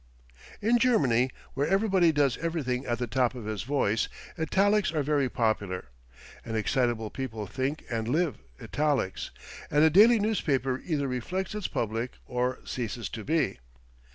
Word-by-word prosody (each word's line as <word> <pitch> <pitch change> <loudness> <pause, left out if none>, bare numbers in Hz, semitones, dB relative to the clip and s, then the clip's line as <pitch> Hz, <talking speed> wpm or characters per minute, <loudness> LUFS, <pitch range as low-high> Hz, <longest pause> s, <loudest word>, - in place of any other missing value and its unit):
In 235 +3 +4
Germany, 130 - +3 0.2
where 140 +2 0
everybody 195 -4 +3
does 140 -5 +2
everything 140 -6 -2
at 120 -1 0
the 125 - -1
top 120 +2 +1
of 120 -4 -7
his 110 -2 -3
voice, 120 -5 0 0.3
italics 195 +4 +2
are 155 -3 0
very 140 -2 +1
popular. 100 - -1 0.5
An 115 - -5
excitable 115 -1 0
people 115 -5 -4
think 130 +8 -3
and 115 -1 -2
live 155 +4 0 0.2
italics, 145 -10 -1 0.4
and 150 +1 +4
a 160 - +6
daily 220 +7 +7
newspaper 140 - 0
either 150 -5 -1
reflects 135 - -3
its 210 -3 -2
public 115 +2 -2
or 125 +1 -1
ceases 120 -1 -4
to 110 - -6
be. 150 - 0
135 Hz, 150 wpm, -28 LUFS, 120-160 Hz, 0.5 s, daily